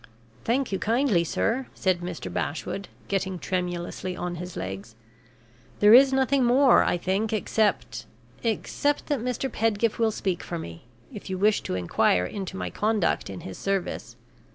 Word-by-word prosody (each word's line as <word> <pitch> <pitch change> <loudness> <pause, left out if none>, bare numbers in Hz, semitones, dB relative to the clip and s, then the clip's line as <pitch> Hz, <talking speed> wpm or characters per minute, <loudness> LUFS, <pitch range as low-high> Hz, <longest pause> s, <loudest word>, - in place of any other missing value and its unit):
"Thank 255 +1 +1
you 195 - -1
kindly, 225 -5 +2
sir," 230 +9 -1
said 185 -2 +1
Mr. 175 -1 -6
Bashwood, 195 +6 -3 0.2
getting 190 -1 -1
tremulously 180 0 -3
on 180 0 -3
his 180 +1 -7
legs. 95 +4 -6 0.8
"There 210 +1 +7
is 265 +2 +8
nothing 265 0 +2
more, 255 +2 +5
I - - +1
think, 195 +5 -1
except 215 0 0 0.3
except 265 +5 -1
that 290 -3 +1
Mr. 250 +3 -2
Pedgift 225 -2 0
will 225 -1 +3
speak 190 -4 -2
for 170 - -5
me, 85 - -8 0.3
if 205 - -8
you 190 - -2
wish 210 +2 +3
to - - -3
inquire 90 0 +2
into 190 - -5
my - - -4
conduct 215 -3 0
in 95 -2 -7
his 95 - -8
service. 195 -2 -2
200 Hz, 155 wpm, -26 LUFS, 175-230 Hz, 0.8 s, is